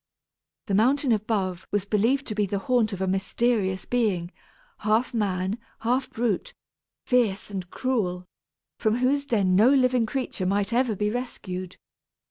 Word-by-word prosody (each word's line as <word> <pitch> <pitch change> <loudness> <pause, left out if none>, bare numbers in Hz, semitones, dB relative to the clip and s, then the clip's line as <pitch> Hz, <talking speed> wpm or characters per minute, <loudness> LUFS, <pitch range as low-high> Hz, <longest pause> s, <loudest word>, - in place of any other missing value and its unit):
The 200 - -3
mountain 260 +6 +3
above 200 -4 -1
was 205 -1 -1
believed 230 +7 +1
to 215 - -3
be 210 -1 0
the 200 - -1
haunt 225 +1 +1
of 195 -1 -5
a 190 - 0
mysterious 195 0 0
being, 200 -8 0 0.5
half 220 +4 +1
man, 195 -1 -1 0.2
half 250 +3 0
brute, 225 -5 -2 0.5
fierce 220 -6 +1
and 185 -3 -5
cruel, 185 -9 -1 0.5
from 220 -1 +2
whose 275 +3 +1
den 195 -7 +2
no 215 +6 +6
living 255 -4 +3
creature 215 -6 -2
might 200 +3 0
ever 240 -2 +2
be 210 +2 0
rescued. 185 -7 -5
215 Hz, 145 wpm, -26 LUFS, 190-245 Hz, 0.5 s, no